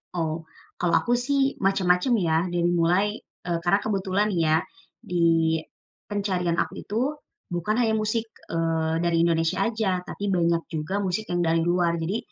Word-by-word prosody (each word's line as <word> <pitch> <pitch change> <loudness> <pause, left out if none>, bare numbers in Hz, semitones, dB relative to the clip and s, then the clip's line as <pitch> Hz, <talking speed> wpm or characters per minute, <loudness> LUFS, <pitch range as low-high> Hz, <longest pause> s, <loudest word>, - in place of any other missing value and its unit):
Oh, 165 -1 -1 0.4
kalau 175 -1 +1
aku 240 - +2
sih 270 +2 +1
macam-macam 195 +3 +2
ya, 165 -4 +2
dari 175 0 +1
mulai, 175 +4 +3 0.4
eee, 170 -1 -1
karena 175 +3 +3
kebetulan 200 0 0
ya, 160 -3 +3 0.4
di, 165 -2 +2 0.5
pencarian 185 -5 -1
aku - - 0
itu, 215 +3 -2 0.5
bukan 210 +6 -1
hanya 225 -3 +2
musik, 220 +1 0 0.2
eee, 165 -1 0
dari 170 0 +1
Indonesia 165 -1 +1
aja, 205 -5 -1
tapi 200 +2 -4
banyak 170 -2 +1
juga 160 +5 -2
musik 200 +2 -2
yang 175 -1 0
dari 165 0 +2
luar, 175 0 +2
jadi, 185 +7 -1
175 Hz, 150 wpm, -25 LUFS, 165-205 Hz, 0.5 s, mulai